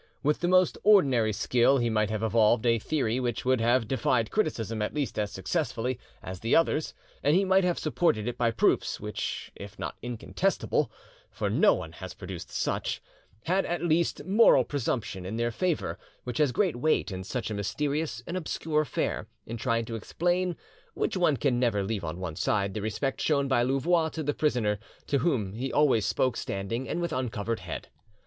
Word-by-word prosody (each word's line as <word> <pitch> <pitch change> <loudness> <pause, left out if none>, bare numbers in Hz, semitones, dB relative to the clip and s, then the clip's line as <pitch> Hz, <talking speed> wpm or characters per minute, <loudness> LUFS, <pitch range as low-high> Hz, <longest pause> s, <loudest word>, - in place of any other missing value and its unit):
With 150 +1 +2
the 175 - 0
most 185 -1 +3
ordinary 135 - +5
skill 125 +5 +3
he 120 -2 +1
might 110 -1 +1
have 110 0 -2
evolved 110 +1 +3
a 115 -1 +3
theory 125 -2 0
which 120 -2 -2
would 130 -2 +3
have 120 0 +3
defied 120 -2 +1
criticism 115 - -1
at 105 - -2
least 145 -6 -2
as 105 -1 -1
successfully, 115 +6 -2 0.2
as 95 -1 -6
the 115 +4 +1
others, 160 -1 +2 0.3
and 145 +3 +3
he 195 +2 +3
might 190 0 +4
have 180 -1 +1
supported 150 - +1
it 120 - -2
by 120 -1 +2
proofs, 115 -1 +1
which - - -4
if 100 +1 -10
not - - -4
incontestable 120 -1 -1 0.4
(for - - -2
no - - +5
one - - -6
has - - -9
produced - - -7
such), - - -2 0.4
had 185 +3 +1
at 175 0 -2
least 170 -2 +1
moral 195 - +6
presumption 115 -7 -2
in 100 +5 -4
their 120 0 0
favour, 175 +7 -1 0.2
which 125 -2 -4
has 150 -4 +4
great 175 -2 +1
weight 130 -6 +1
in 95 0 -5
such 115 +2 -4
a - - -1
mysterious 140 - -2
and 170 - -5
obscure 160 -3 -1
affair, 155 - -2 0.2
in 115 - -5
trying 115 0 0
to 115 - -7
explain, 175 - 0 0.4
which - - -1
one 170 -6 +3
can 120 0 +1
never 115 -5 +1
leave 100 -1 -3
on 85 +2 -4
one 90 -4 -4
side, 100 +1 0
the 105 - -3
respect 110 +6 -2
shown 140 -3 +2
by 130 -3 +3
Louvois 160 +6 +2
to 160 0 -5
the 145 0 0
prisoner, 120 -10 +1 0.3
to 140 - +1
whom 115 - 0
he 130 +5 -3
always 130 -8 +3
spoke 125 +2 +1
standing 105 +6 -3
and 175 - -1
with 170 -2 -2
uncovered 115 -4 -2
head. 90 -3 -7
125 Hz, 190 wpm, -28 LUFS, 110-155 Hz, 0.4 s, moral